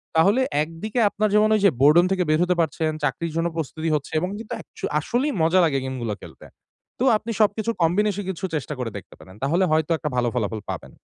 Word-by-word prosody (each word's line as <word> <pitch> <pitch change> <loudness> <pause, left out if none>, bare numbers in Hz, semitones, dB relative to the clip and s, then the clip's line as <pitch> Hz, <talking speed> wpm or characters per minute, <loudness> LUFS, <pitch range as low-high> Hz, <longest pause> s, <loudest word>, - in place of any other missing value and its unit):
তাহলে 200 +10 +4 0.2
একদিকে 165 +9 -4
আপনার 215 +1 0
যেমন 215 +1 +5
ওইযে 200 -2 +4
বোরডোম 160 +5 +6
থেকে 185 -1 +2
বের 155 0 +3
হতে 180 0 +1
পারছেন, 160 0 -1
চাকরির 155 +4 -1
জন্য 165 +1 +1
প্রস্তুতি 160 +1 -3
হচ্ছে 145 - -4
এবং 180 - -2
কিন্তু 225 -1 -7
একচু - - -8
আসলেই 265 +4 -1
মজা 165 +3 +4
লাগে 140 -4 +1
গেমগুলো 120 -5 -3
খেলতে। - - -13 0.5
তো - - 0
আপনি 230 +2 -6
সবকিছুর 215 +2 +1
কম্বিনেশন 205 +4 +1
এ - - -9
কিছু 190 0 -4
চেষ্টা 150 0 -3
করে 120 -3 -3
দেখতে - - -12
পারেন। 95 +1 -14
তাহলে 170 +7 +2
হয়তো 155 +1 +1
একটা 150 -2 -3
ভালো 120 - +2
ফলাফল 110 -2 -2
পাবেন। - - -7
165 Hz, 205 wpm, -23 LUFS, 150-205 Hz, 0.5 s, বোরডোম